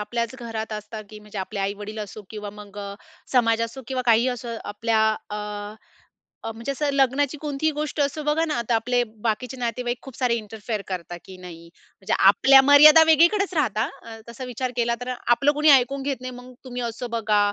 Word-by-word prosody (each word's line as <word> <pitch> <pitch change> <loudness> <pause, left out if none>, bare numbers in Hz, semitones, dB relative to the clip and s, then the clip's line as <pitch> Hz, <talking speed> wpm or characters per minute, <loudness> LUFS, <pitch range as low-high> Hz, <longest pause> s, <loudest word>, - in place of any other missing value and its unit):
आपल्याच 235 +3 -3
घरात 225 -2 -5
असतात, 215 +1 -7
की 215 - -10
म्हणजे 210 -1 -9
आपले 200 +2 -4
आई-वडील 205 +2 -4
असो 210 0 -7
किंवा 210 -1 -6
मग 205 0 -12
अ, 200 -1 -6 0.4
समाज 230 -3 +3
असो 230 +4 -5
किंवा 260 -1 -2
काहीही 235 +2 +4
असो, 245 -1 -5 0.2
आपल्या 220 +2 0 0.3
अ, 210 - -3 1.1
अ, 225 - -4
म्हणजे 230 +5 -5
असं 290 +2 -1
लग्नाची 275 +2 +1
कोणतीही 300 +1 -1
गोष्ट 300 +1 -4
असो 285 +2 -1
बघा 300 +2 +1
ना, 310 - -2
आता 235 0 0
आपले 245 +2 +1 0.2
बाकीचे 250 +4 -2
नातेवाईक 245 0 -2
खूप 270 -3 -11
सारे 250 -3 +1
इंटरफेअर 215 -1 -5
करतात 175 -2 -6
की 190 - -11
नाही. 170 -2 -11 0.3
म्हणजे 200 +2 -2
आपल्या 270 +7 +7
मर्यादा 300 +3 +8
वेगळीकडेच 345 +5 +4
राहतात, 235 - 0 0.2
अ, 225 -1 -9
तस 235 +2 -11
विचार 250 0 -4
केला 235 -1 +1
तर, 250 - -5 0.2
आपलं 275 +4 +4
कुणी 300 +1 +3
ऐकून 270 +1 +4
घेत 275 -2 -3
नाही. 255 0 -5
"मग 250 +1 -12
तुम्ही 250 -1 -6
असं 235 +1 -4
बघा, 220 -2 +1
235 Hz, 190 wpm, -24 LUFS, 215-270 Hz, 1.1 s, मर्यादा